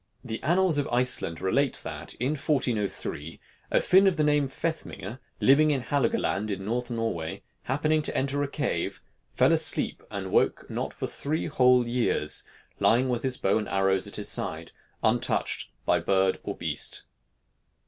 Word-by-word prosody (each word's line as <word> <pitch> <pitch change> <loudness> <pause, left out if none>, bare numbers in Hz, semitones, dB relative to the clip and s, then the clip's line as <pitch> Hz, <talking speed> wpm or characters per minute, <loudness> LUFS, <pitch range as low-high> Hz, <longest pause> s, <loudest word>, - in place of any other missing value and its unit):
The 110 -2 -5
annals 170 0 +3
of 145 - -1
Iceland 120 -9 +1
relate 135 +8 +1
that, 80 0 -6
in 125 +4 -1
1403, 120 - -1 0.3
a - - +3
Finn 195 +2 +5
of 185 -3 +2
the 155 - +2
name 150 -1 +3
of 135 - -7
Fethmingr, 130 - -5 0.2
living 150 +3 +5
in 140 -3 +1
Halogaland, 115 -6 0
in 100 - -2
the 95 - -9
North 120 +3 -2
of 120 - -3
Norway, 85 -9 -3 0.2
happening 155 +4 +1
to - - -1
enter 140 +1 0
a 145 - 0
cave, 100 - -2 0.3
fell - - +3
asleep, - - +2
and - - -5
woke - - +1
not - - -3
for - - -5
three 155 +3 -2
whole 125 -4 +4
years, 120 0 +1 0.4
lying 125 +3 +3
with 120 -2 -1
his 130 -2 -1
bow 100 +3 +1
and 105 - -5
arrows 95 0 +1
at 100 - -8
his 105 - -1
side, 85 -8 -1 0.3
untouched - - 0 0.2
by - - +3
bird 95 -1 +1
or - - -5
beast. - - -1
125 Hz, 170 wpm, -27 LUFS, 100-145 Hz, 0.4 s, Finn